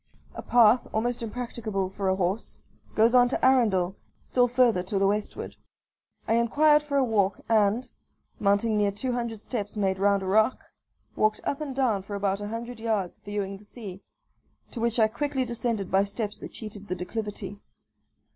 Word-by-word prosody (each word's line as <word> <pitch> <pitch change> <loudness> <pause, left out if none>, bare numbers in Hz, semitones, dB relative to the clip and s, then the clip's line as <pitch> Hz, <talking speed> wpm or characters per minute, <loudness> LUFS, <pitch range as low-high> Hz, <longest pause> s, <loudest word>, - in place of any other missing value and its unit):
A - - -6
path, 235 0 +4
almost 240 +3 -1
impracticable 220 -4 -3
for 195 -1 -2
a 190 - +2
horse, 190 +4 -2 0.4
goes 225 +2 +4
on 245 -1 +6
to - - 0
Arendall, 205 -8 +3 0.3
still 245 -1 +2
further 240 -5 +3
to 190 +2 -3
the 195 - +3
westward. 205 +1 -2 0.7
I 225 - +2
inquired 295 +6 +4
for 290 -1 -2
a 275 - +4
walk, 205 -5 +1
and, 220 +2 +2 0.5
mounting 205 +2 +2
near 205 -1 +3
two 205 +6 -3
hundred 235 -3 -3
steps 215 -4 -4
made 190 -2 0
round 200 0 +3
a - - -4
rock, 215 +6 +2 0.5
walked 215 0 +1
up 280 - -2
and 280 -4 -4
down 240 -7 +1
for 200 +2 -7
about 200 0 -1
a 205 - -4
hundred 230 +2 -6
yards 215 -5 -2
viewing 200 -1 -4
the 200 - -17
sea, 205 -3 -9 0.7
to 240 - -6
which 235 +1 0
I 220 - +6
quickly 265 +3 -2
descended 230 -4 -2
by 195 +1 +4
steps 205 +1 -3
that - - -8
cheated 210 -2 -8
the 185 - -2
declivity. 205 +1 -5
215 Hz, 175 wpm, -27 LUFS, 200-240 Hz, 0.7 s, on